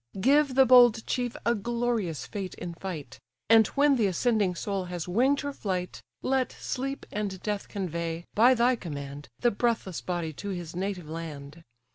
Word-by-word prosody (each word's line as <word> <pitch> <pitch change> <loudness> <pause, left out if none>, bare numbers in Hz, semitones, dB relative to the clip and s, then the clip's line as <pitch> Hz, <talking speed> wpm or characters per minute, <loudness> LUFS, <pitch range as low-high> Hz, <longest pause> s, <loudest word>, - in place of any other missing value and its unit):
Give 275 +4 +3
the 265 0 +7
bold 245 -3 +6
chief 245 -2 -2
a 235 - +4
glorious 235 -6 -2
fate 195 -3 -5
in 170 - -6
fight; 170 -4 -7 0.3
And 225 -1 +7
when 285 -1 +5
the 220 -4 +3
ascending 200 -1 +1
soul 195 +1 -3
has 175 -2 -5
wing'd 255 +10 +2
her 285 0 -4
flight, 185 -7 -3 0.2
Let 260 -1 +1
Sleep 275 +2 -4
and 205 -3 -3
Death 210 -2 -2
convey, 170 -3 -4
by 245 +4 +6
thy 245 +2 +3
command, 145 -5 -7
The 240 - +4
breathless 220 -5 -1
body 170 -3 -3
to 200 +7 -6
his 175 -3 -5
native 185 -3 -3
land. 155 -1 -7
200 Hz, 165 wpm, -28 LUFS, 175-240 Hz, 0.3 s, the